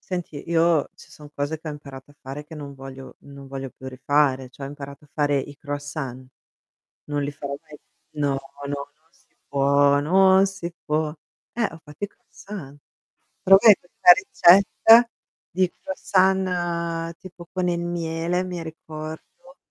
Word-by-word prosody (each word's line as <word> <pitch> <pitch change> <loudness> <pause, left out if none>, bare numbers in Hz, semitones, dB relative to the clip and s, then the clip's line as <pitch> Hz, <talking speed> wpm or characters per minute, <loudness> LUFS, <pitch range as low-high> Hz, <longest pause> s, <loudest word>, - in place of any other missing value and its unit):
Senti, 175 -5 -5
io 165 -2 +3
ci - - -17
son 150 -1 -13
cose 145 +2 -3
che 160 - -9
ho - - -4
imparato 140 -2 -11
a 145 - -19
fare 135 +3 -7
che 155 +2 -12
non 145 -2 -8
voglio 135 0 -11
non 140 -1 -12
voglio 135 0 -6
più 130 - -11
rifare, 130 0 +1
cioè 135 +2 -9
ho - - -6
imparato 140 0 -10
a - - -28
fare 145 -2 +1
i 140 +1 -5
croissant. 145 -3 -6 0.8
Non 145 0 -1
li 140 +1 -2
farò 140 0 -6
mai 155 -2 -14 0.3
no, 140 -2 -1 0.3
no, 140 0 -2 0.2
non 155 +1 -37
si - - -33
può, 140 0 +4
non 190 +5 +5
si 185 -3 -6
può. 155 0 0 0.4
Eh, 235 - -2
ho 165 - -13
fatto 150 +6 -11
i - - -13
croissant. 175 -8 -11 0.6
Provai 195 +3 +8
questa 265 - +5 0.6
ricetta 230 +1 +6 0.4
di 185 0 +1
croissant 175 -3 0
tipo 175 -2 -13
con 185 -1 -1
il 170 -1 0
miele, 170 +1 -2
mi 180 -2 -5
ricordo, 160 - -10
155 Hz, 160 wpm, -24 LUFS, 140-175 Hz, 0.8 s, Provai